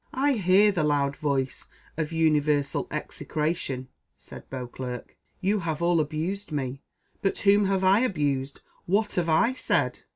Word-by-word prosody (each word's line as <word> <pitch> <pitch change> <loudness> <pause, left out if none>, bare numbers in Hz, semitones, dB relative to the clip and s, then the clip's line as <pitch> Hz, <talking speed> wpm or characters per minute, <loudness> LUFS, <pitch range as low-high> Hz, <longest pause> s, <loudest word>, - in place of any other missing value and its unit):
"I 280 +2 +3
hear 200 -1 +4
the 175 -5 0
loud 140 -2 +1
voice 135 -3 -2 0.3
of 155 0 -2
universal 150 -3 +1
execration," 150 -5 -3 0.3
said - - -12
Beauclerc; 125 -1 -6 0.3
"you 200 +2 +1
have 160 -4 -3
all 170 -1 +3
abused 160 +7 -2
me, 135 -2 -3 0.4
but 195 - 0
whom 205 0 +4
have 195 -1 +1
I 190 +3 +5
abused? 145 - -1 0.3
What 205 +4 +1
have 170 -2 0
I 230 +11 +3
said?" 255 - 0
160 Hz, 140 wpm, -26 LUFS, 140-195 Hz, 0.4 s, I